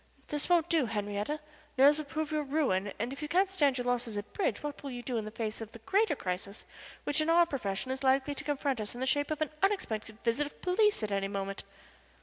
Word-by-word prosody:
This 295 +2 -2
won't 345 -2 +4
do, 320 -8 +2
Henriette. 210 +6 -2 0.4
Nerves 285 +3 +7
will 305 - -4
prove 310 +1 -3
your 305 -1 +1
ruin, 270 -10 +1
and 235 +5 -2
if 275 - -8
you 300 - -2
can't 375 +5 +3
stand 285 -8 +3
your 245 - -2
losses 245 -3 0
at 205 0 -6
bridge, 395 - 0
what 295 -1 -4
will 280 - -5
you 245 -2 -6
do 245 -2 -2
in 220 - -2
the - - -4
face 220 0 -4
of 225 0 -7
the - - -8
greater 380 - +2
crisis 195 0 -4 0.4
which 290 +1 +1
in 310 - 0
our 340 +1 +6
profession 250 -5 -2
is 265 +1 -3
likely 270 +1 +3
to 295 - -6
confront 280 -4 0
us 210 +2 -4
in - - -7
the 260 - 0
shape 290 +2 +2
of 310 0 -2
an 305 - -5
unexpected 225 - 0
visit 245 +5 +1
of - - -15
police 415 - +3
at 210 - -2
any 195 0 +1
moment?" 195 0 -3
270 Hz, 245 wpm, -31 LUFS, 215-305 Hz, 0.4 s, Nerves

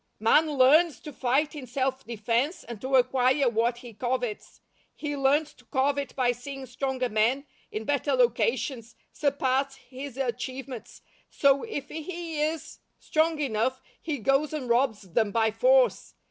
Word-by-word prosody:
Man 265 +9 +4
LEARNS 295 +3 +4
to 300 - -9
fight 265 +5 +1
in 285 -4 -8
self 265 +2 -1
defense, 235 - -1
and 235 -3 -9
to 265 +1 0
acquire 255 +2 +3
what 235 +1 +1
he 240 -1 -11
covets. 245 -1 -3 0.4
He 290 -1 -4
learns 290 +3 +2
to - - -22
covet 280 0 0
by 250 -2 +2
seeing 270 +2 -7
stronger 255 0 -2
men, 235 +5 +1 0.3
in 215 - -4
better 285 +1 0
locations, 235 -1 0 0.2
surpass 275 -1 0
his 270 0 -9
achievements, 255 0 -5 0.3
so 280 -1 +3
if 290 -12 -5
he 325 -1 -5
is 315 +1 -3 0.2
strong 315 0 +1
enough 260 -1 0 0.2
he 310 -3 -3
goes 275 +6 +1
and 285 -5 -3
robs 235 -2 +2
them 205 +4 0
by 220 0 +2
force. - - +3
265 Hz, 145 wpm, -27 LUFS, 240-285 Hz, 0.4 s, Man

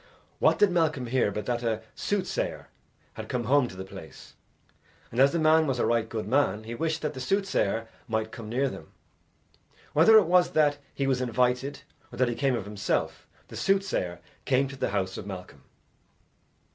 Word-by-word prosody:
What - - +4
did 205 -3 +4
Malcolm 160 -6 +1
hear 120 -2 +1
but 105 0 -4
that 120 0 -1
a 110 -2 -1
soothsayer 205 -2 -2 0.4
had - - -8
come 125 -1 -1
home 130 +2 +3
to 95 - -10
the 95 - -6
place, 95 -6 -12 0.8
and 120 - -3
as 135 +1 +6
the 170 - 0
man 160 0 +4
was 135 -2 0
a - - +1
right 115 -1 +1
good 110 -3 -4
man, 110 -5 +1
he 115 +2 -6
wished 160 +5 -2
that 150 - -1
the 130 - -7
soothsayer 125 - 0 0.2
might 110 -1 -2
come 110 -2 -8
near 130 +4 +1
them. - - -9 1.0
Whether 170 +9 +7
it 210 - +6
was 180 +1 +3
that 145 -2 +3
he 140 - -2
was 130 -1 +1
invited 125 +3 0 0.3
or - - -10
that 130 -1 +2
he - - -1
came 135 +1 +1
of 105 - -4
himself, 100 -1 -2 0.2
the - - -10
soothsayer 195 - 0 0.2
came 135 +1 +2
to 140 - -8
the 130 - -1
house 95 -2 -2
of 100 - -8
Malcolm. 95 -2 -8
125 Hz, 190 wpm, -27 LUFS, 110-150 Hz, 1.0 s, Whether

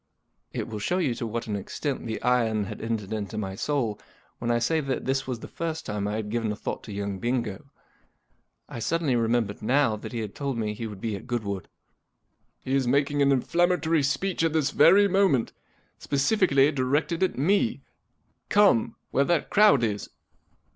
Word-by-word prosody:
It - - -4
will 110 -2 -5
show 175 - 0
you 155 -9 +1
to 115 0 -4
what 115 +2 -3
an 105 - -3
extent 130 +7 -4
the 110 - -3
iron 115 -4 +2
had 100 - -7
entered 110 -2 -3
into 105 0 -4
my 95 -3 -3
soul 115 -1 -1 0.4
when 120 - -3
I 120 - +3
say 160 +8 +1
that 135 -3 -3
this 135 +1 +1
w.as 125 -3 -5
the - - -7
first 165 -1 -4
time 105 -1 -2
I 105 - -2
had 105 -1 -4
given 115 -2 -1
a - - -3
thought - - -5
to 110 - -8
young 100 -1 -4
Bingo. 120 +1 -2 1.0
I - - -7
suddenly 160 +2 0
remem¬ 115 0 +2
bered 100 0 -9
now 130 0 +2
that - - -8
he 120 -2 -3
had 105 -2 -5
told 140 -3 -3
me 105 -2 -1
he 115 +2 -5
would 105 -3 -9
be 110 -3 -2
at 100 - -9
Goodwood. 105 -6 -3 1.0
'He 130 - -3
is 135 -2 +2
making 140 +2 +2
an 140 0 +4
inflammatory 165 +3 +2
speech 165 +6 0
at 165 -1 +1
this 155 -4 +1
very 190 +7 +6
moment, 190 - +2 0.5
specifically 140 -1 +3
directed 145 +5 0
at 185 - +1
me. 200 - +1 0.7
Come! 200 - +4 0.2
Where 140 - +2
that 170 0 0
crowd 205 - +5
is." 105 -3 -2
125 Hz, 190 wpm, -26 LUFS, 110-150 Hz, 1.0 s, very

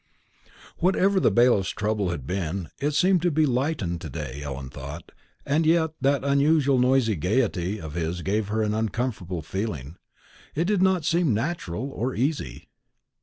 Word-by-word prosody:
Whatever 190 +2 +3
the - - +4
bailiff's 120 -5 +3
trouble 105 -2 -1
had 80 -7 -4
been, 90 0 -3
it 145 +1 -1
seemed 185 +1 +4
to 175 - +2
be 155 -1 +2
lightened 125 - -1
to 80 - -6
day, 65 +1 -6
Ellen 70 -2 -6
thought; 70 +5 -8 0.3
and 150 +3 +2
yet 160 0 +3
that 140 0 +2
unusual 140 -1 +3
noisy 125 -3 +3
gaiety 100 - 0
of 80 -4 -7
his 85 +1 -3
gave 105 +1 0
her 110 +1 0
an 105 0 0
uncomfortable 110 -6 -2
feeling: 80 - -4 0.6
it 165 +3 +1
did 200 -1 +1
not 190 -4 +3
seem 165 -8 +2
natural 135 - -3
or 130 +1 -3
easy. 125 - -2
115 Hz, 160 wpm, -25 LUFS, -, 0.6 s, the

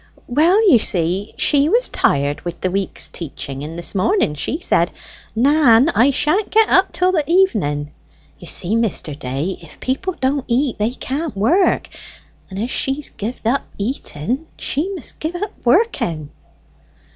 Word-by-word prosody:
"Well, 350 - +3
you 255 -11 +7
see 185 +1 -2
she 290 0 +3
was 480 +6 +3
tired 145 +1 0
with 175 - -6
the 185 - 0
week's 195 0 -2
teaching, 140 -4 -7
and 155 +3 -6
this 170 - -2
morning 200 - +1
she 210 - -3
said, 170 - +2 0.5
'Nan, 270 +1 +5
I 260 -4 +4
sha'n't 310 +9 +1
get 440 0 +4
up 380 0 +4
till 365 0 +2
the 325 -5 +1
evening.' 185 - +1 0.5
You - - -11
see, 190 +5 -1
Mr. 220 -9 -1
Day, 140 +6 -4
if 165 - -13
people 340 +8 -2
don't 265 +1 0
eat, 250 0 0
they 210 +2 +2
can't 270 +1 -4
work; 330 - +2 0.6
and 190 - -8
as 230 +5 -2
she've 270 +2 -2
gie'd 225 +3 -5
up 255 +5 +2 0.2
eating, 240 - -3
she 305 +8 -1
must 335 - -8
gie 315 +2 -3
up 415 0 -3
working." 235 - +1
245 Hz, 155 wpm, -19 LUFS, -, 0.6 s, you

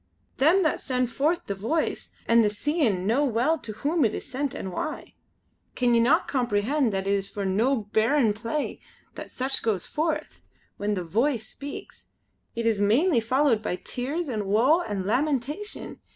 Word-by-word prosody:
Them 330 +9 +4
that 310 - +1
send 250 -2 -1
forth 305 +8 0
the 200 - -2
Voice 230 +12 -2 0.2
and 230 0 +5
the 210 - +3
Seein' 215 - 0
know 235 +8 +2
well 270 +5 +1
to 220 - -6
whom 290 +9 0
it 220 - +1
is - - -6
sent 275 +1 -3
and 190 - -5
why. 310 +12 -5 0.6
Can 245 -1 +2
ye 230 - +5
no 280 +9 +4
comprehend 245 +1 +1
that 195 -1 -2
it 195 - 0
is 195 0 -1
for 200 -1 -4
no 220 +9 +2 0.2
bairn 225 0 +3
play 230 +7 -3 0.3
that - - -8
such 265 +1 -2
goes 210 -6 0
forth. 315 +1 -2 0.4
When 205 0 -1
the 180 - -3
Voice 225 - 0
speaks, 285 +4 -9 0.5
it 230 0 -2
is 220 -3 +2
mainly 240 - +3
followed 250 0 +2
by 195 - -2
tears 280 - -3
an' 215 -6 -3
woe 250 - +4
an' 200 - -3
lamentation! 285 - -2
240 Hz, 175 wpm, -26 LUFS, 210-290 Hz, 0.6 s, and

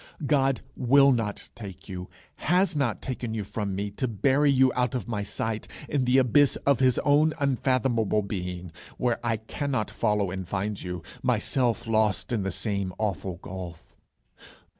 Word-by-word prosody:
God 135 -2 +2
will 140 +2 +5
not 115 -5 -2
take 95 -4 -10
you, 90 -1 -6 0.3
has 180 +1 +2
not 130 -7 0
taken 120 -3 -4
you 110 - -2
from 100 0 -3
me 100 +1 -3
to 130 +6 -2
bury 135 +6 +2
you 130 -1 +4
out 125 -1 0
of 120 -6 -3
my 110 -3 -2
sight 110 +1 -3 0.2
in 140 -3 0
the 125 +1 +4
abyss 135 +2 +4
of 140 -3 +4
his 130 -2 +3
own 150 +2 +4
unfathomable 130 -6 +1
being, 90 -3 -5 0.3
where 120 -1 0
I 115 -2 +1
cannot 110 +1 -3
follow 105 -4 0
and 95 -1 -5
find 100 +1 -2
you, 90 -2 -5 0.2
myself 120 0 +1
lost 110 +1 +1
in 110 - +1
the 95 - -1
same 100 -1 -2
awful 100 -4 -2
gulf. 90 -3 -8
115 Hz, 160 wpm, -27 LUFS, 100-130 Hz, 0.3 s, will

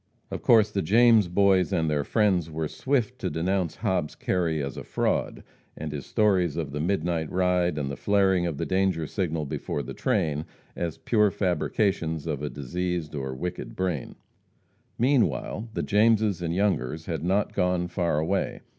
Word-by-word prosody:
Of - - -4
course 110 -3 +5
the 100 - 0
James 110 +2 +5
Boys 95 +1 +3
and 80 -4 +1
their 75 -2 0
friends 95 -4 +1
were 80 0 -3
swift 125 - -1
to - - -2
denounce 90 0 -1
Hobbs 90 -5 -1
Kerry 85 -4 0
as 70 -1 -4
a - - -6
fraud, - - -1 0.3
and 80 0 -5
his 70 -3 -6
stories 95 -7 +2
of 80 -4 -3
the 75 - -4
midnight 85 -2 -1
ride 90 -2 +1
and 70 -2 -2
the - - -4
flaring 95 -2 +2
of 80 -4 -3
the - - -2
"danger 95 -4 +1
signal" 80 -3 -2
before 70 0 -3
the - - -7
train, 75 0 0 0.3
as 85 -3 -3
pure 105 -3 +2
fabrications 90 -4 0
of 75 -4 -3
a 75 - -2
diseased 85 +3 -3
or 65 -2 -4
wicked 90 +6 -5
brain. 90 -7 -2 0.8
Meanwhile, 120 -3 +1
the - - -1
Jameses 110 -2 +3
and 85 0 -2
Youngers 80 -6 0
had 80 -4 -3
not 95 +4 +1
gone 90 -1 +1
far 85 -3 -1
away. 85 +6 -1
90 Hz, 170 wpm, -26 LUFS, 80-100 Hz, 0.8 s, course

